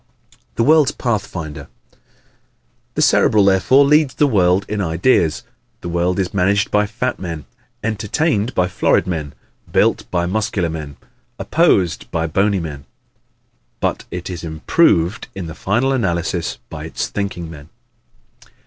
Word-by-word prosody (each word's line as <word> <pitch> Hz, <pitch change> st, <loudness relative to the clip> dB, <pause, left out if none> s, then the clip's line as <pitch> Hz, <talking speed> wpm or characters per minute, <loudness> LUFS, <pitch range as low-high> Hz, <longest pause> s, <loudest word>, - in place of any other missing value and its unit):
The 115 Hz, -, +1 dB
World's 150 Hz, 0 st, +5 dB
Pathfinder 95 Hz, -, -4 dB, 0.3 s
¶ -, -, -28 dB, 1.0 s
The -, -, +2 dB
Cerebral 105 Hz, -2 st, +4 dB
therefore 100 Hz, +9 st, +4 dB
leads 150 Hz, -1 st, +3 dB
the 150 Hz, -, +3 dB
world 95 Hz, -6 st, +2 dB
in 105 Hz, -1 st, -2 dB
ideas. 85 Hz, +2 st, +1 dB, 0.4 s
The 85 Hz, -, -5 dB
world 85 Hz, +1 st, 0 dB
is 95 Hz, -2 st, -1 dB
managed 100 Hz, +1 st, +1 dB
by 105 Hz, 0 st, +2 dB
fat 120 Hz, +4 st, -3 dB
men, 85 Hz, -5 st, -6 dB, 0.4 s
entertained 110 Hz, +3 st, -1 dB
by 90 Hz, -, +2 dB
florid 90 Hz, -, +1 dB
men, 80 Hz, -5 st, -4 dB, 0.4 s
built -, -, +2 dB
by 85 Hz, -1 st, 0 dB
muscular 95 Hz, -3 st, -1 dB
men, 75 Hz, -3 st, -7 dB, 0.4 s
opposed 90 Hz, -4 st, +1 dB
by 80 Hz, 0 st, -1 dB
bony 95 Hz, +4 st, +1 dB
men, 75 Hz, -5 st, -7 dB, 0.9 s
but -, -, -2 dB
is 90 Hz, -1 st, -6 dB
improved 85 Hz, -, +1 dB
in 95 Hz, -2 st, -5 dB
the 80 Hz, -, -7 dB
final 120 Hz, +10 st, 0 dB
analysis 85 Hz, -7 st, -1 dB
by -, -, -6 dB
its -, -, -3 dB
thinking 90 Hz, -5 st, -4 dB
men. 75 Hz, -1 st, -12 dB
95 Hz, 135 wpm, -19 LUFS, 85-110 Hz, 1.0 s, World's